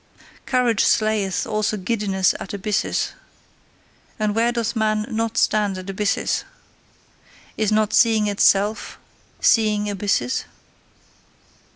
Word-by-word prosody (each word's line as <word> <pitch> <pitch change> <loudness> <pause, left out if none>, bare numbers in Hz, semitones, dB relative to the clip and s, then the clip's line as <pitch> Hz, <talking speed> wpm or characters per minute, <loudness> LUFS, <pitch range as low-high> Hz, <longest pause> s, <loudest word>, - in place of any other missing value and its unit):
Courage 250 -4 +2
slayeth 215 -3 +1
also 215 0 -1
giddiness 195 -2 0
at 200 - -6
abysses: 205 +1 -1 1.1
and 215 -1 0
where 230 +2 +2
doth 235 -1 -2
man 215 -1 0
not 225 0 -2
stand 205 -3 +1
at 185 0 -8
abysses! 200 +1 -1 1.1
Is 215 -1 0
not 215 0 +1
seeing 225 -3 +4
itself 205 +1 +1 0.4
seeing 210 -2 +2
abysses? 195 -11 -1
215 Hz, 100 wpm, -21 LUFS, 200-220 Hz, 1.1 s, seeing